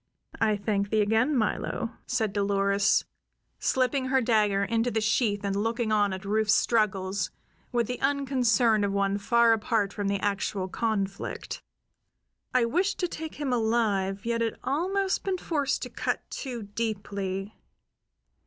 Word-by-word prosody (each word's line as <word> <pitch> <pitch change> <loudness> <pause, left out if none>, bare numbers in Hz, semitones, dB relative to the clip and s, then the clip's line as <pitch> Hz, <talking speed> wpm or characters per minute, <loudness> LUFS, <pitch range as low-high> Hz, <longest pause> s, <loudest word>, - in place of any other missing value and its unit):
"I 215 -2 +2
thank 200 -1 -1
thee 215 0 +2
again, 225 +7 +2
Milo," 225 +1 -1 0.2
said 225 -5 0
Dolores, 200 0 +2 0.5
slipping 260 +1 +1
her 265 0 +3
dagger 210 -4 +2
into 230 +3 +1
the 225 - 0
sheath 215 -1 +1
and 195 0 -1
looking 225 +2 0
on 205 -2 +3
at 190 +1 -6
Rufe's 215 +1 +3
struggles 205 -4 +1 0.4
with 240 -2 +1
the 250 +3 -5
unconcern 255 -6 +2
of 200 - +1
one 200 0 0
far 235 +2 +4
apart 215 -2 0
from 205 -2 -2
the 200 0 0
actual 200 -1 -1
conflict. 200 -1 -3 0.9
"I 250 -2 +3
wished 365 +11 0
to 360 - +2
take 320 -1 -6
him 285 -3 -2
alive; 215 -4 0
yet 230 0 0
had 230 -1 -1
almost 375 +7 0
been 385 -1 -1
forced 290 -5 -1
to - - -5
cut - - -2
too 245 -5 -5
deeply. 200 -2 -3
220 Hz, 145 wpm, -27 LUFS, 200-245 Hz, 0.9 s, far